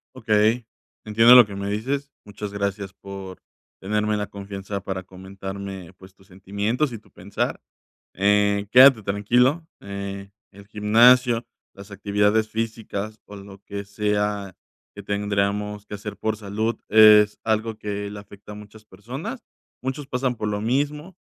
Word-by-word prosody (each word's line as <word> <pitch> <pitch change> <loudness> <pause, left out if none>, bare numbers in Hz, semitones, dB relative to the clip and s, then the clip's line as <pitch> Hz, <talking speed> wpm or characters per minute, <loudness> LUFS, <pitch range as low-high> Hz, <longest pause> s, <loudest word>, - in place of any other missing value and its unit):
Okey, 110 0 +2 0.4
entiendo 115 +3 +7
lo 125 -2 +9
que 100 -1 -9
me 100 0 -4
dices. 135 +7 -3
Muchas 105 0 -7
gracias 100 -1 -3
por 95 -1 -10 0.4
tenerme 105 +2 -1
la 105 0 -3
confianza 100 0 -7
para 95 -1 -5
comentarme, 95 0 -8
pues, 95 0 -17
tus 95 -1 -24
sentimientos 100 +9 -2
y 115 - -7
tu - - -25
pensar, - - -4 0.5
eh, 100 +1 +2
quédate 130 -2 +8
tranquilo. 125 - +1
Eh, 100 0 -7 0.2
el 100 +1 -16
gimnasio, 115 +3 +4 0.3
las 100 +1 -13
actividades 105 +2 +1
físicas 110 -1 -4
o 105 - -12
lo 100 0 -11
que 100 0 -6
sea 105 -1 -2 0.4
que 100 - -9
tendríamos 105 +1 -2
que 105 - -8
hacer 105 +1 -7
por 110 0 -2
salud, 110 +2 -2
es 105 -1 +6
algo 110 0 -1
que 105 -1 -5
le 105 0 -8
afecta 100 0 -13
a - - -8
muchas 105 +1 -13
personas. 130 - -8 0.4
Muchos 135 +2 -4
pasan 125 -2 -2
por 105 - -4
lo 105 0 -2
mismo. 145 - -2
105 Hz, 145 wpm, -23 LUFS, 100-110 Hz, 0.5 s, lo